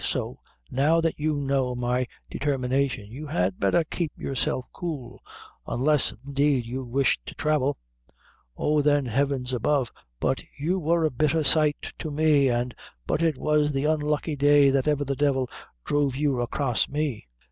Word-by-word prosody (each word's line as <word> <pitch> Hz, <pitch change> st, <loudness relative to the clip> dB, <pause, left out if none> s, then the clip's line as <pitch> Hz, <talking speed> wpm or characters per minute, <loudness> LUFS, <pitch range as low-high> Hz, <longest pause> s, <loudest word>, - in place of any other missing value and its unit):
So -, -, -2 dB, 0.3 s
now 150 Hz, +6 st, +3 dB
that 165 Hz, -2 st, -1 dB
you 155 Hz, 0 st, 0 dB
know 135 Hz, -3 st, 0 dB
my 125 Hz, +1 st, 0 dB, 0.2 s
determination 130 Hz, -5 st, -1 dB
you 150 Hz, +5 st, -7 dB
had 90 Hz, -6 st, -1 dB
betther 100 Hz, -, +3 dB
keep 160 Hz, 0 st, -3 dB
yourself 130 Hz, -1 st, -1 dB
cool, 140 Hz, -8 st, -6 dB, 0.5 s
unless, 145 Hz, +3 st, +2 dB
indeed, 140 Hz, -2 st, +1 dB
you 130 Hz, +3 st, -4 dB
wish 130 Hz, +2 st, +1 dB
to -, -, -8 dB
thravel. 145 Hz, -2 st, +1 dB, 0.8 s
Oh, 150 Hz, 0 st, +2 dB
then 145 Hz, -1 st, +3 dB
heaven's 130 Hz, +1 st, -1 dB
above, 125 Hz, +1 st, +1 dB, 0.3 s
but -, -, 0 dB, 0.2 s
you 170 Hz, +7 st, 0 dB
wor 165 Hz, 0 st, +2 dB
a 155 Hz, -, +1 dB
bitther 155 Hz, +4 st, +1 dB
sight 150 Hz, +1 st, +2 dB
to 160 Hz, -, -4 dB
me, 150 Hz, -2 st, +3 dB
an' 120 Hz, +1 st, 0 dB, 0.3 s
but -, -, -1 dB
it 160 Hz, -4 st, +1 dB
was 150 Hz, 0 st, +1 dB
the 135 Hz, +1 st, 0 dB
unlucky 150 Hz, 0 st, 0 dB
day 145 Hz, 0 st, +5 dB
that 135 Hz, +1 st, +1 dB
ever 145 Hz, -1 st, +1 dB
the 140 Hz, 0 st, -1 dB
divil 135 Hz, -2 st, +1 dB, 0.4 s
druv 145 Hz, -3 st, +1 dB
you 140 Hz, -3 st, 0 dB
acrass 120 Hz, 0 st, 0 dB
me!" 145 Hz, -, -3 dB
140 Hz, 160 wpm, -26 LUFS, 130-150 Hz, 0.8 s, day